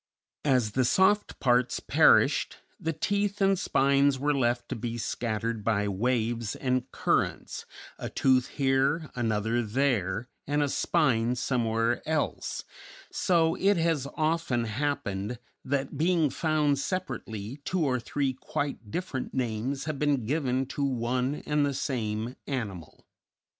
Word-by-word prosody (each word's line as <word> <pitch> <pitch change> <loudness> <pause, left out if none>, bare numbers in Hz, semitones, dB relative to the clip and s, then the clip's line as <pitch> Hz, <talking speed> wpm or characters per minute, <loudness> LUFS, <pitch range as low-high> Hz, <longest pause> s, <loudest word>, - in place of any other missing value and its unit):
As 125 -6 +3
the 130 +4 +2
soft 190 +10 +3
parts 125 -1 +2
perished - - +4 0.2
the 165 - -1
teeth 200 +4 -1
and 195 -2 +3
spines 140 -4 +3
were 145 +3 +1
left 120 -3 0
to - - -2
be 115 +1 -4
scattered 115 -1 -2
by 105 -2 +1
waves 115 +2 0
and 130 -1 -1
currents, - - -1 0.3
a - - -4
tooth 130 -1 +3
here, 140 +3 +1
another 115 0 0
there, 115 -3 0 0.2
and 145 +1 +2
a 145 - 0
spine 120 -4 +2
somewhere 115 -2 0
else; 155 -2 -1 0.5
so 165 -3 +2
it 195 +2 +2
has 165 -5 +1
often 155 -6 0
happened 110 -3 -2 0.3
that, 135 +1 -2
being 165 -3 +3
found 150 -2 +1
separately, 125 - -4
two 180 -1 0
or 130 -2 +1
three 135 +2 -1
quite 140 -3 -4
different 140 - -4
names 125 +2 -1
have 155 -3 -3
been 145 -5 +1
given 135 -1 0
to 140 +2 -4
one 130 +1 -1
and 150 -1 +2
the 140 -1 0
same 115 -2 -2
animal. 105 - -5
130 Hz, 130 wpm, -28 LUFS, 115-150 Hz, 0.5 s, perished